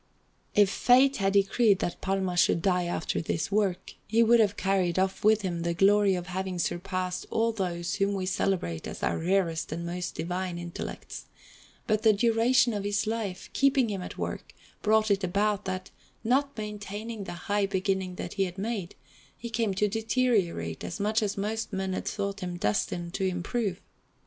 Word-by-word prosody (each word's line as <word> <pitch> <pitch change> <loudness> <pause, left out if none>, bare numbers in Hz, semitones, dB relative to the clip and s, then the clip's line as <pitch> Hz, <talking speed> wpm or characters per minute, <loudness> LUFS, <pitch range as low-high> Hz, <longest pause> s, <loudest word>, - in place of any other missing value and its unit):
If 205 -2 +5
Fate 260 +5 +4
had 195 -1 +1
decreed 200 +1 +4
that 175 - -3
Palma 190 -2 -1
should 170 -1 +3
die 180 -2 +2
after 175 -1 -2
this 160 +2 -2
work, 195 -3 0
he 225 +2 +4
would 235 +1 +5
have 205 -2 +3
carried 190 -3 +1
off 190 0 0
with 215 0 +4
him 175 -3 -2
the 170 0 -1
glory 200 +1 +4
of 175 -1 -4
having 185 0 -3
surpassed 180 +1 -2
all 230 +1 +1
those 175 -5 -2
whom 200 0 +1
we 190 -1 -2
celebrate 185 - -1
as - - -7
our - - 0
rarest 170 -2 0
and 170 +2 -4
most 175 +1 -4
divine 180 +1 -3
intellects; 175 0 -7 0.6
but 215 -1 +1
the 220 -1 +5
duration 235 +3 +3
of 205 -1 -2
his 205 +1 0
life, 215 -4 -3
keeping 275 -4 +3
him 195 -2 -3
at - - -7
work, - - -5 0.3
brought 215 0 +3
it 200 0 +2
about 200 +3 0
that, 185 0 -4 0.3
not 275 +4 +1
maintaining 210 0 -5
the - - -6
high 205 -1 +1
beginning 190 -1 -1
that - - -5
he 195 -1 +1
had 180 0 -7
made, 200 -3 -3 0.4
he 235 0 -7
came 220 -3 0
to 210 +2 +2
deteriorate 215 - 0
as 175 - -5
much 215 +3 +1
as 205 -2 -1
most 220 +3 -2
men 190 -1 -2
had - - -4
thought 200 -1 -2
him 180 -2 -4
destined 170 +8 -1
to 195 - -2
improve. 190 +2 -1
195 Hz, 180 wpm, -28 LUFS, 180-215 Hz, 0.6 s, If